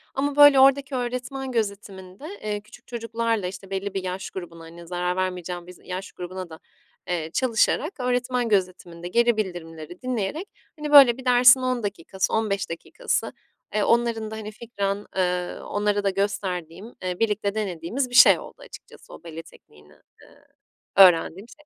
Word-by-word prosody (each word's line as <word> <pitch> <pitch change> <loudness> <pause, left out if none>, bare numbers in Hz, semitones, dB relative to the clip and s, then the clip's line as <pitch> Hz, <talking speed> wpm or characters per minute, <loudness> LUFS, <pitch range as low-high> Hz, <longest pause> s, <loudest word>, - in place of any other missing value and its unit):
Ama, 280 +1 -1
böyle, 290 -2 +8
oradaki 275 +1 +4
öğretmen 255 +2 -4
gözetiminde, 200 -1 -5 0.2
eee, 210 -1 -3
küçük 215 +2 -18
çocuklarla, 230 -3 -2
işte, 190 +1 -9
belli 195 0 -4
bir 195 - -3
yaş 185 +1 -4
grubuna 170 -3 -9
hani, 170 +1 -12
zarar 180 0 -2
vermeyeceğim 180 -1 -4
bir - - -9
z - - -20
yaş 185 +1 -6
grubuna 180 0 -7
da, 160 - -11 0.5
eee, 170 -3 -2
çalışarak, 260 - +1
öğretmen 250 -1 -1
gözetiminde 180 -3 -2
geri 235 +3 +2
bildirimleri 175 -4 -6
dinleyerek, 255 - -3 0.3
hani, 300 0 -4
böyle 270 -5 +8
bir 260 - -11
dersin 250 +1 +7
10 255 -2 -1
dakikası, 195 -1 -3
15 210 -3 -1
dakikası, 170 - -3 0.4
eee, 210 - +1
onların 230 -2 +1
da, - - -5
hani, 215 -1 -7
fikren, 205 -3 -4
eee, 180 -1 -1
onlara 205 0 -1
da 200 - +2
gösterdiğim, 195 0 -3
eee, 180 -1 -3
birlikte 210 -2 0
denediğimiz 210 +5 -3
bir 245 - -6
şey - - +8
oldu - - -11
açıkçası - - -14
o - - -13
bale 165 -1 -8
tekniğinden, 75 - -20 0.2
eee, - - -20 0.5
öğrendiğim 185 +1 +5
şey. 300 - -18
200 Hz, 160 wpm, -24 LUFS, 180-240 Hz, 0.5 s, böyle